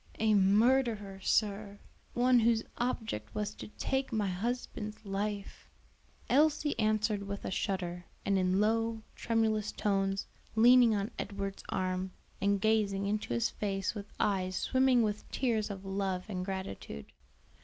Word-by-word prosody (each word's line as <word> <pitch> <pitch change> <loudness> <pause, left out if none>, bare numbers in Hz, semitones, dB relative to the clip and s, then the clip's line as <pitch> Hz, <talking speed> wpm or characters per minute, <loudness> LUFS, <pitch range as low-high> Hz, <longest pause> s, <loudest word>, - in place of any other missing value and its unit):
"A 220 -1 +3
murderer, 210 0 +3
sir; 205 0 0 0.4
one 250 0 +5
whose 230 0 +3 0.2
object 220 - -3
was 210 -1 -2
to - - -9
take 265 +5 -2
my 210 -4 0
husband's 215 +1 -4
life," 200 +1 -4 0.6
Elsie 295 +2 +3
answered 215 -1 +1
with 200 0 -5
a - - -3
shudder, 180 -3 -2 0.2
and 200 - +2
in 185 +1 +2
low, 225 +1 +1
tremulous 220 -2 0
tones, 195 -1 0 0.3
leaning 240 0 +7
on 200 +1 -2
Edward's 200 -1 -4
arm 185 0 -2 0.3
and 200 0 +2
gazing 200 -2 +1
into 210 - -2
his 115 - +1
face 195 -2 -2
with 205 -2 -7
eyes 185 -2 0
swimming 260 0 +3
with 210 -1 -3
tears 225 -5 0
of 195 -1 -7
love 190 -1 -2
and 185 -4 -3
gratitude. 190 - -6
210 Hz, 135 wpm, -32 LUFS, 195-225 Hz, 0.6 s, leaning